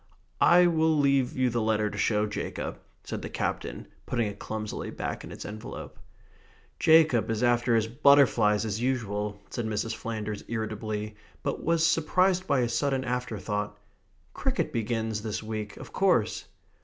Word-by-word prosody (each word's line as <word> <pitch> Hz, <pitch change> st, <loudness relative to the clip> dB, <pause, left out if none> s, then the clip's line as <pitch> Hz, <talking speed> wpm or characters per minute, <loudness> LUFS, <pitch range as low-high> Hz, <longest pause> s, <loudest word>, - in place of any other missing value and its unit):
"I 175 Hz, +1 st, +7 dB
will 160 Hz, -2 st, +3 dB
leave 140 Hz, -3 st, +2 dB
you 130 Hz, -1 st, +2 dB
the 120 Hz, 0 st, 0 dB
letter 110 Hz, -1 st, +1 dB
to 105 Hz, -, -7 dB
show 105 Hz, 0 st, +2 dB
Jacob," 60 Hz, -, -4 dB, 0.2 s
said -, -, -5 dB
the -, -, -6 dB
Captain, -, -, -3 dB, 0.2 s
putting 120 Hz, -2 st, 0 dB
it 100 Hz, -1 st, -5 dB
clumsily 110 Hz, -1 st, -4 dB
back -, -, -4 dB
in -, -, -9 dB
its -, -, -8 dB
envelope. 105 Hz, +1 st, -8 dB, 0.8 s
"Jacob 160 Hz, -8 st, +5 dB
is 110 Hz, +1 st, -1 dB
after 120 Hz, -1 st, +3 dB
his 110 Hz, -1 st, +3 dB
butterflies 115 Hz, -4 st, +4 dB
as 110 Hz, +1 st, -2 dB
usual," 105 Hz, -5 st, -1 dB
said 120 Hz, -2 st, -3 dB
Mrs. 110 Hz, +1 st, -2 dB
Flanders 110 Hz, -2 st, -4 dB
irritably, 110 Hz, -1 st, -4 dB, 0.3 s
but -, -, -2 dB
was 165 Hz, 0 st, +2 dB
surprised 185 Hz, +3 st, +2 dB
by 140 Hz, -2 st, +3 dB
a 120 Hz, -, +1 dB
sudden 130 Hz, +3 st, 0 dB
afterthought, 110 Hz, -5 st, -3 dB, 0.6 s
"Cricket -, -, -1 dB
begins 110 Hz, -1 st, -1 dB
this 110 Hz, 0 st, -4 dB
week, 110 Hz, -2 st, -5 dB
of -, -, -10 dB
course." -, -, +2 dB
115 Hz, 155 wpm, -28 LUFS, 105-130 Hz, 0.8 s, I